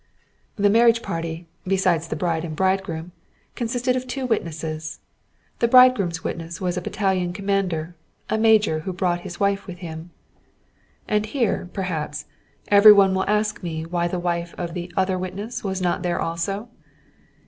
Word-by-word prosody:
The 205 -3 +3
marriage 230 +1 +4
party, 165 0 -4 0.2
besides 180 -4 +1
the - - -3
bride 165 -2 -1
and 160 -2 -5
bridegroom, 185 -2 -1 0.4
consisted 245 +2 -1
of 255 0 -3
two 260 +1 -3
witnesses; 160 -8 -3 0.6
the 235 - +3
bridegroom's 230 -10 +5
witness 165 0 -5
was 180 -2 -1
a 180 - -2
battalion 190 -3 -1
commander, 190 -4 -1 0.3
a - - 0
major 215 -7 +4
who 185 +4 -5
brought 175 -1 0
his 175 -1 -8
wife 200 0 0
with 180 -2 -7
him. 165 -1 -8 1.0
And 210 0 +1
here, 225 -7 -1
perhaps, 170 -6 -3 0.4
every 205 +1 +9
one 195 -2 +5
will 190 +1 0
ask 210 0 0
me 160 -3 -4
why 170 +1 -1
the 180 - -3
wife 170 -1 -2
of 170 -1 -4
the 175 0 -5
other 185 -1 +1
witness 195 +6 -5
was 190 -2 -2
not 175 - 0
there 175 -1 -1
also? 195 +7 -3
185 Hz, 160 wpm, -23 LUFS, 170-205 Hz, 1.0 s, every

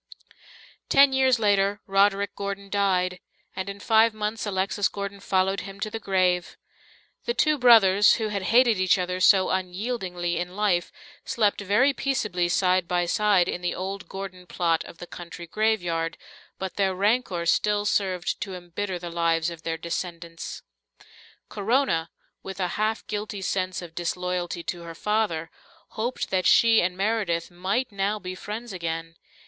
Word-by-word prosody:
Ten 275 0 +6
years 260 -2 +4
later 205 -1 +2
Roderick 200 0 +2
Gordon 200 0 -5
died, 185 -2 +1 0.4
and 190 +1 -4
in 200 0 -7
five 225 0 +4
months 215 +1 -3
Alexis 195 +1 0
Gordon 200 0 -6
followed 190 0 +1
him 195 0 -9
to 215 +1 -3
the 225 - -4
grave. 185 -3 0 0.7
The 475 - -1
two 305 -2 +2
brothers 210 -5 +6
who 220 -1 -2
had 200 -2 -2
hated 235 -3 +5
each 185 +1 +4
other 180 0 -2
so 185 0 +5
unyieldingly 185 -2 -2
in 180 +1 -5
life 200 -4 +1 0.3
slept 210 -5 0
very 210 +8 +3
peaceably 215 -11 -1
side 185 -1 +2
by 175 -1 +1
side 195 -1 +3
in 175 - -3
the 175 - -2
old 190 +1 -5
Gordon 190 -2 -7
plot 165 -2 0
of - - -12
the 175 - -8
country 175 0 -9
graveyard, 175 -5 -1 0.4
but 190 -1 -5
their 190 -2 +1
rancour 200 -3 +1
still 205 +4 +2
served 190 -3 0
to 195 -2 -4
embitter 180 +2 -4
the 175 -1 -7
lives 165 0 +1
of 165 -1 -9
their 165 0 -3
descendants. 170 0 -6 0.8
Corona, 205 -6 0 0.3
with 195 0 -8
a 180 -1 0
half 215 +4 -1
guilty 205 -1 -4
sense 185 -1 -2
of 165 -2 -10
disloyalty 175 0 -3
to 175 0 -4
her 165 -1 -9
father, 190 -5 -1 0.4
hoped 235 +4 -3
that 185 -1 +2
she 230 -1 +6
and 180 +1 -1
Meredith 195 -5 -1
might 195 +8 -1
now 200 +1 -1
be 185 -3 -6
friends 210 +4 -6
again. 165 -2 -4
190 Hz, 155 wpm, -25 LUFS, 175-210 Hz, 0.8 s, Ten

